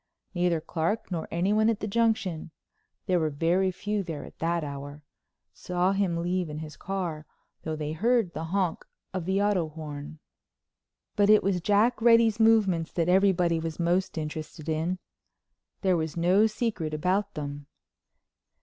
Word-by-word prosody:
Neither 175 -2 +1
Clark 170 +7 -2
nor 165 -3 -3
anyone 210 +6 +2
at 225 -2 0
the - - -3
Junction—there 195 -4 -2
were 160 -1 +1
very 170 +6 +1
few 205 +3 -2
there 165 -6 -6
at - - -15
that 170 0 0
hour—saw 145 +5 -5
him 195 -4 0
leave 175 0 -1
in 150 - -6
his 155 -1 -7
car, 175 -6 -4 0.3
though 160 -1 -3
they 150 -1 -4
heard 220 +2 +1
the 160 +2 -4
honk 185 0 -1 0.3
of 185 -3 -3
the 190 +2 +1
auto 190 -6 +1
horn. 150 -1 -8 1.0
But 205 -1 +3
it 215 0 +6
was 190 -2 0
Jack 215 +5 +2
Reddy's 230 -1 +5
movements 205 -7 +3
that 170 0 0
everybody 180 -3 +3
was 160 0 -5
most 175 +2 0
interested 155 0 -6
in. 160 +3 -1 0.8
There 185 -3 +3
was 160 0 -3
no 185 +6 +4
secret 210 -9 -2
about 190 +6 0
them. 145 -1 -6
175 Hz, 150 wpm, -27 LUFS, 160-200 Hz, 1.0 s, it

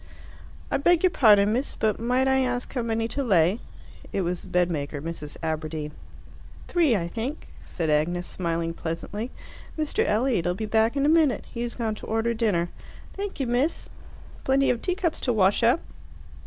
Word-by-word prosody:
"I - - +2
beg 345 +4 +3
your 370 - +5
pardon, 210 -6 +5
miss, 255 +4 -1
but 215 -1 0
might 250 +3 +1
I 265 0 +3
ask 250 -1 -1
how 255 - -1
many 225 -1 -1
to 280 +5 -2
lay?" 190 -2 +3 0.5
It 195 - 0
was 175 0 -2
the - - -12
bedmaker, 160 -5 0
Mrs. 150 -1 -6
Aberdeen. 155 -1 -3 0.8
"Three, 325 -9 +3
I 170 -4 -1
think," 240 - -5
said 160 -3 -2
Agnes, 175 +4 +1
smiling 165 -2 -2
pleasantly. 175 +8 -4 0.5
"Mr. 310 -1 0
Elliot'll 210 -6 +1
be 220 - -3
back 220 +4 +2
in 275 - +2
a - - +4
minute. 305 -7 +3
He 235 - -4
has 240 0 -3
gone 225 -3 -1
to 215 - -9
order 225 +1 0
dinner. 205 -7 +1 0.4
"Thank 400 -4 -5
you, 270 - 0
miss." 250 +7 0 0.5
"Plenty 270 +1 +3
of 240 - -2
teacups 360 -3 -1
to 245 - 0
wash 200 0 +3
up!" 235 +7 +4
225 Hz, 175 wpm, -26 LUFS, 175-265 Hz, 0.8 s, your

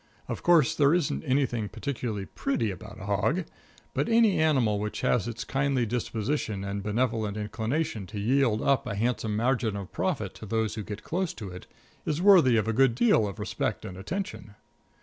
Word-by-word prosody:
Of - - -4
course, 165 -7 +5
there 145 +2 +4
isn't 135 - 0
anything 125 -5 0
particularly 115 -4 -4
pretty 115 0 -1
about 105 +3 -10
a 105 - -7
hog, 125 - +1 0.5
but - - 0
any 225 -5 +4
animal 130 -10 +3
which 105 +1 -3
has 120 -2 +1
its 115 -1 -4
kindly 135 -2 0
disposition 115 -1 -2
and 100 0 -3
benevolent 110 0 -1
inclination 110 - -2
to 100 - -6
yield 115 0 +2
up 135 -2 +2
a 105 - -3
handsome 110 0 -1
margin 115 -1 +1
of 100 -2 -6
profit 120 - -2
to 110 - -10
those 110 +1 0
who 110 - -4
get 105 +1 -7
close 180 +1 -2
to 105 -4 -7
it, 90 +1 -10 0.4
is 155 0 -1
worthy 175 - +6
of 110 -1 +1
a 115 - +1
good 130 0 +4
deal 120 -3 +4
of 100 - -6
respect - - -3
and 95 - -7
attention. 155 - -5
115 Hz, 185 wpm, -28 LUFS, 105-140 Hz, 0.5 s, worthy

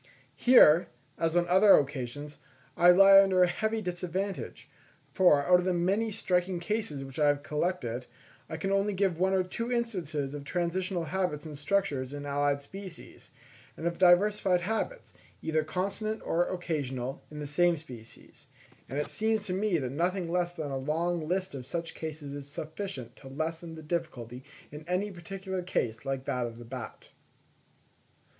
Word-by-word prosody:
Here, 180 -10 +6 0.3
as 165 0 0
on 175 0 +3
other 190 +3 +7
occasions, 145 +1 -3 0.4
I 175 - +6
lie 195 +2 +9
under 190 -2 +4
a - - +5
heavy 220 +4 -1
disadvantage, 180 +2 -4 0.4
for, 165 -7 +5
out 180 +2 +6
of 180 - -3
the 185 -1 +1
many 195 +6 +1
striking 185 -4 0
cases 175 -7 -2
which 135 +2 -8
I 150 - +4
have 145 0 +2
collected, 150 -7 -2 0.4
I 160 - -4
can 195 +4 -2 0.2
give 195 0 +2
only 165 - -10
one 190 +1 +3
or 190 -1 +3
two 230 +6 -4
instances 175 - -2
of 145 -1 -6
transitional 175 +3 -1
habits 175 -3 -2
and 155 -2 -7
structures 145 -5 -1
in 145 0 -6
allied 140 0 0
species; 190 +4 -11 0.5
and 160 - -6
of 170 0 -1
diversified 185 0 +4
habits, 225 - -3 0.3
either 160 -1 +1
constant 200 +7 -3
or 175 +1 +1
occasional, 140 -7 -3
in 150 - -10
the 150 - -4
same 170 +4 +2
species. 125 -7 -13 0.4
And 135 - -4
it 150 - -1
seems 220 -1 0
to 185 - -3
me 195 -1 +1
that 130 -5 -3
nothing 175 +3 -1
less 175 0 +1
than 155 -5 -5
a 135 - -2
long 160 +4 -1
list 185 +1 -1
of 135 -2 -6
such 165 +5 -4
cases 155 -3 -6
is 140 -1 -7
sufficient 150 - -6
to 135 - -12
lessen 160 +4 -4
the 160 - -10
difficulty 135 -7 -4 0.3
in 150 +1 -9
any 185 +3 -1
particular 190 +1 -5
case 115 -10 -2
like 135 -1 -3
that 125 -1 -1
of 115 -1 -9
the 120 - -10
bat. 125 0 -8
170 Hz, 170 wpm, -29 LUFS, 145-190 Hz, 0.5 s, lie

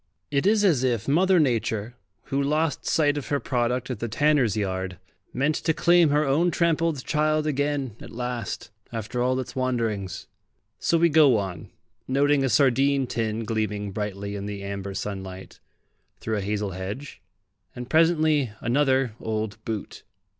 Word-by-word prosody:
It 140 +6 +1
is 210 0 +4
as 150 -10 +3
if 120 -5 0
Mother 180 +5 +4
Nature, 115 -5 0 0.3
who 140 +1 -1
lost 150 +1 0
sight 145 -2 +2
of 140 - -9
her 145 - 0
product 125 0 -1
at 120 - -4
the 115 - -2
tanner's 130 -3 +2
yard, 95 -2 -2 0.3
meant 140 +5 +1
to 160 -2 0
claim 175 -2 +5
her 150 +1 +2
own 155 +6 +2
trampled 165 -4 0
child 155 0 +1
again 145 -5 -1
at - - -9
last, 120 -3 -5 0.2
after 115 +2 -3
all 130 +1 +1
its 130 - -6
wanderings. 115 -7 -2 0.5
So 170 - +2
we 170 +1 +5
go 150 -6 +5
on, 95 -5 -5 0.4
noting 140 +1 +3
a 135 - +1
sardine 135 +2 +3
tin 115 -2 -2
gleaming 105 -2 -2
brightly 100 0 -4
in 100 0 -5
the 100 -1 -6
amber 100 0 -5
sunlight, 95 -2 -6 0.6
through 110 -1 -2
a - - -2
hazel 100 0 -2
hedge, 100 +10 -6 0.5
and 125 0 -6
presently 155 -5 +3
another 130 -1 +1
old 110 -2 -4
boot. 110 -3 -5
125 Hz, 155 wpm, -25 LUFS, 105-145 Hz, 0.6 s, claim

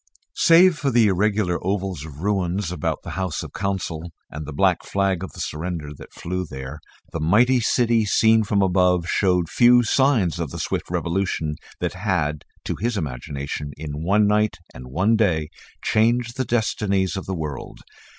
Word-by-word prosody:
Save 170 0 +5
for 140 - 0
the 120 -3 +4
irregular 100 -2 0
oval 95 +1 -1
of 75 -1 -10
ruins 95 -2 -1
about 90 -4 -3
the - - -7
House 95 -3 -3
of - - -9
the - - -8
Council 85 -4 -3 0.2
and 75 0 -7
the - - -5
black 70 - +2
flag 95 -2 0
of 95 - -7
the - - -11
surrender 80 -1 -4
that - - -13
fluttered 90 +1 -4
there, 65 +1 -7 0.3
the 85 - -4
mighty 115 +11 +4
city 115 -1 +2
seen 110 +2 +4
from 100 -1 +1
above 90 -2 +2
showed 90 -3 +1
few 120 +6 +5
signs 115 - +2
of 80 -4 -2
the - - -7
swift - - -3
revolution 85 -3 -1 0.3
that - - -2
had, 90 -6 -1 0.2
to - - -3
his 115 0 -1
imagination, 70 0 -5
in 75 -1 -6
one 105 +4 +3
night 105 -1 +2 0.2
and 60 0 -10
one 95 - +2
day, 85 -9 +1 0.3
changed 115 +2 +1
the 130 - -1
destinies 100 -6 0
of 95 - -5
the 95 - -2
world. 75 -4 -6
95 Hz, 175 wpm, -22 LUFS, 80-110 Hz, 0.3 s, Save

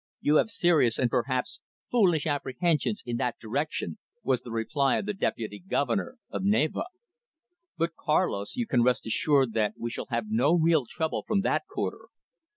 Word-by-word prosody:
You 150 +1 +3
have 220 - +2
serious 165 - +3
and 125 -2 +1
perhaps 125 0 -1 0.3
foolish 180 -11 +3
apprehensions 155 - 0
in 120 -1 -2
that 120 0 -1
direction," 145 - -3 0.2
was 130 -3 +1
the 125 - -10
reply 135 +5 +1
of - - -3
the 210 - -2
Deputy 110 - -3
Governor 145 - -1
of - - -3
Navarre. 200 - +1 0.9
"But, 165 0 0
Carlos, 150 - 0
you 245 - -1
can 125 - +2
rest 125 +1 +2
assured 135 +1 +2
that 105 -2 0
we 120 0 -4
shall - - -5
have 115 -2 -1
no 130 +9 +3
real 160 -6 +3
trouble 160 +3 -2
from 205 -2 +2
that 195 - 0
quarter. 400 0 -4
145 Hz, 165 wpm, -28 LUFS, 120-175 Hz, 0.9 s, You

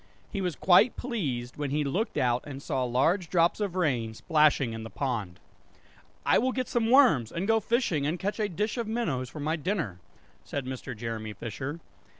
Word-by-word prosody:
He 200 - -2
was 180 -4 -1
quite 185 - +5
pleased 140 - -3
when 145 -1 -2
he 150 +2 0
looked 180 - -1
out 125 -1 +2
and 135 -2 -6
saw 135 -2 -2
large 160 +9 +1
drops 170 +1 +3
of 200 -4 -2
rain, 125 -11 0
splashing 150 -4 +3
in 115 - -5
the 110 - -7
pond 110 -11 -3 0.9
"I - - +5
will 260 +3 +1
get 255 -1 -2
some 230 -2 0
worms 235 - +5
and 180 +4 -3
go 225 0 +4
fishing 210 - 0
and 165 +4 -1
catch 200 +4 -3
a 210 -1 0
dish 210 +6 -2
of 230 - -2
minnows 160 - -1
for 155 - -9
my 155 +3 0
dinner," 155 - -2 0.4
said 140 -2 -4
Mr. 130 -2 -6
Jeremy 110 -1 -4
Fisher. 135 +10 -5
150 Hz, 190 wpm, -28 LUFS, 125-205 Hz, 0.9 s, quite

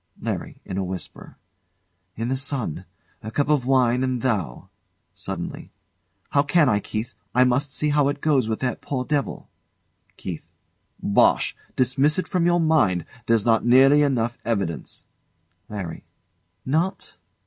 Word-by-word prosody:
LARRY. - - -4
[In 95 - -4
a - - 0
whisper] 95 0 -7 0.8
In 115 +2 -3
the 130 - +1
sun! 130 - -2 0.4
"A 110 - -6
cup 145 +5 0
of 140 -5 +2
wine 125 -1 +3
and 130 -2 -1
thou." 100 - -2 0.4
[Suddenly] - - -6 0.6
How 140 - +4
can 150 +1 +3
I, 105 -4 +3
Keith? 110 +3 -5 0.2
I 125 - +6
must 130 +3 +1
see 150 +2 0
how 145 -1 +3
it 145 +1 -1
goes 140 -7 +2
with 110 - -2
that 125 -1 -2
poor 130 -3 -3
devil. 145 -5 -2 0.7
KEITH. 90 -4 -5 0.6
Bosh! 100 - +3 0.2
Dismiss 135 +5 +2
it 185 - -1
from 175 -2 +1
your 175 0 +3
mind; 135 - +2 0.2
there's 115 -2 +3
not 115 -1 +3
nearly 135 +4 +6
enough 120 -4 0
evidence. 100 -8 -3 0.6
LARRY. 95 -6 -6 0.6
Not? 160 +8 -1
130 Hz, 145 wpm, -24 LUFS, 110-145 Hz, 0.8 s, I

